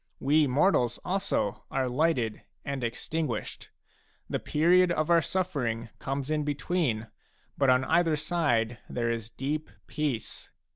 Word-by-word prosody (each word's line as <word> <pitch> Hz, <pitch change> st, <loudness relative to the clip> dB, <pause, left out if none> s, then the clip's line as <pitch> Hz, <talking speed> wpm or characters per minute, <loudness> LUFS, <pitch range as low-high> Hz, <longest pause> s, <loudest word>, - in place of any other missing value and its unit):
We 150 Hz, +2 st, +3 dB
mortals 125 Hz, -3 st, +3 dB
also 190 Hz, -, -1 dB
are 130 Hz, -1 st, 0 dB
lighted 125 Hz, -4 st, +1 dB, 0.2 s
and 140 Hz, -2 st, -3 dB
extinguished; 125 Hz, +1 st, -3 dB, 0.6 s
the -, -, -2 dB
period 175 Hz, +4 st, +4 dB
of 155 Hz, -2 st, 0 dB
sufFering 150 Hz, -10 st, +1 dB
comes 135 Hz, +2 st, -3 dB
in 155 Hz, -1 st, +1 dB
between, 145 Hz, -5 st, -1 dB, 0.5 s
but 135 Hz, -2 st, +2 dB
on 130 Hz, +1 st, +4 dB
either 165 Hz, -1 st, +3 dB
side 145 Hz, -8 st, 0 dB
there 115 Hz, -1 st, -1 dB
is 115 Hz, -1 st, -4 dB
a -, -, -37 dB
deep 150 Hz, +3 st, -2 dB, 0.2 s
peace. 145 Hz, -7 st, -3 dB
145 Hz, 130 wpm, -28 LUFS, 120-165 Hz, 0.6 s, period